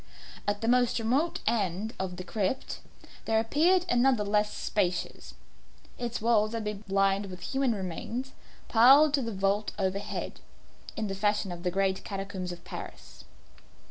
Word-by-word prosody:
At 205 Hz, 0 st, 0 dB
the 225 Hz, -, -1 dB
most 245 Hz, 0 st, +3 dB
remote 255 Hz, +9 st, 0 dB
end 205 Hz, 0 st, 0 dB
of 190 Hz, -1 st, -3 dB
the 180 Hz, -, -5 dB
crypt 210 Hz, +6 st, -2 dB, 0.5 s
there 220 Hz, 0 st, +2 dB
appeared 335 Hz, +11 st, +3 dB
another 245 Hz, -2 st, +3 dB
less 210 Hz, +1 st, +1 dB
spacious. 180 Hz, -4 st, -2 dB, 0.6 s
Its 240 Hz, -1 st, -3 dB
walls 220 Hz, -1 st, +2 dB
had 225 Hz, -1 st, -2 dB
been 210 Hz, -1 st, -4 dB
lined 195 Hz, +1 st, +2 dB
with 180 Hz, -1 st, -9 dB
human 265 Hz, +3 st, 0 dB
remains, 215 Hz, +8 st, -4 dB, 0.4 s
piled 275 Hz, +6 st, +7 dB
to 280 Hz, -, +3 dB
the 230 Hz, -2 st, -3 dB
vault 200 Hz, +1 st, 0 dB
overhead, 195 Hz, 0 st, -3 dB, 0.6 s
in 220 Hz, -, -1 dB
the 195 Hz, -, -3 dB
fashion 205 Hz, -1 st, 0 dB
of 175 Hz, -1 st, -6 dB
the 180 Hz, -, 0 dB
great 190 Hz, +1 st, 0 dB
catacombs 195 Hz, -2 st, -5 dB
of 175 Hz, -1 st, -9 dB
Paris. -, -, -9 dB
210 Hz, 150 wpm, -29 LUFS, 195-235 Hz, 0.6 s, piled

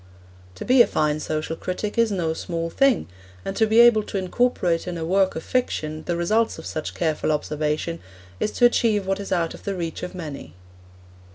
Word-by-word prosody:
To -, -, -7 dB
be 255 Hz, 0 st, +6 dB
a -, -, +6 dB
fine 150 Hz, -1 st, 0 dB
social 155 Hz, +1 st, -3 dB
critic 185 Hz, +5 st, -4 dB
is 230 Hz, -2 st, +2 dB
no 170 Hz, -5 st, 0 dB
small 165 Hz, 0 st, -4 dB
thing, 275 Hz, +1 st, +2 dB, 0.4 s
and 195 Hz, -, -3 dB
to 220 Hz, -, +3 dB
be 220 Hz, +2 st, +4 dB
able 235 Hz, -2 st, +6 dB
to -, -, -4 dB
incorporate 185 Hz, -3 st, 0 dB
in 175 Hz, -1 st, -3 dB
a 160 Hz, -, -3 dB
work 190 Hz, +2 st, +2 dB
of 160 Hz, -, -5 dB
fiction 155 Hz, -11 st, -2 dB
the 175 Hz, -, 0 dB
results 215 Hz, +7 st, +1 dB
of -, -, -9 dB
such 155 Hz, -, -5 dB
careful 155 Hz, -2 st, 0 dB
observation 150 Hz, +2 st, -2 dB, 0.4 s
is -, -, 0 dB
to 245 Hz, -, +4 dB
achieve 220 Hz, -4 st, +3 dB
what 195 Hz, +1 st, -1 dB
is 200 Hz, -, -6 dB
out 170 Hz, -2 st, 0 dB
of -, -, -12 dB
the 200 Hz, -, -3 dB
reach 170 Hz, -3 st, -4 dB
of 180 Hz, +1 st, -6 dB
many. 145 Hz, -, -7 dB
180 Hz, 200 wpm, -23 LUFS, 160-215 Hz, 0.4 s, be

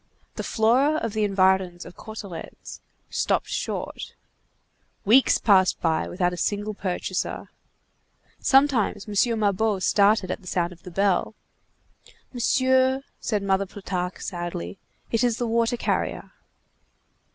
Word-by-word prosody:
The -, -, -5 dB
Flora 250 Hz, +7 st, +2 dB
of 230 Hz, -7 st, -3 dB
the 215 Hz, -1 st, 0 dB
Environs 190 Hz, -3 st, +2 dB
of -, -, -12 dB
Cauteretz_ 200 Hz, -6 st, -9 dB, 0.3 s
stopped -, -, 0 dB
short. -, -, -4 dB, 0.9 s
Weeks 245 Hz, +6 st, +5 dB
passed 190 Hz, -4 st, +3 dB
by 160 Hz, -1 st, 0 dB
without 180 Hz, -1 st, 0 dB
a -, -, -6 dB
single 205 Hz, +3 st, -1 dB
purchaser. 190 Hz, -3 st, -3 dB, 0.9 s
Sometimes 265 Hz, -7 st, +2 dB
M. 210 Hz, -, -6 dB, 0.3 s
Mabeuf 205 Hz, -1 st, +1 dB
started 200 Hz, -2 st, +3 dB
at -, -, -4 dB
the 185 Hz, -, -15 dB
sound 175 Hz, 0 st, -1 dB
of 170 Hz, -, -19 dB
the 180 Hz, -, -10 dB
bell. 195 Hz, +3 st, 0 dB, 1.0 s
"Monsieur," 260 Hz, +2 st, +2 dB, 0.2 s
said 210 Hz, -3 st, -1 dB
Mother 195 Hz, 0 st, +1 dB
Plutarque 185 Hz, -2 st, -4 dB
sadly, 175 Hz, -, -5 dB, 0.3 s
"it 230 Hz, +1 st, +1 dB
is 240 Hz, -2 st, +1 dB
the 240 Hz, -, -1 dB
water 230 Hz, +1 st, +1 dB
carrier." -, -, -2 dB
205 Hz, 125 wpm, -24 LUFS, 185-230 Hz, 1.0 s, Weeks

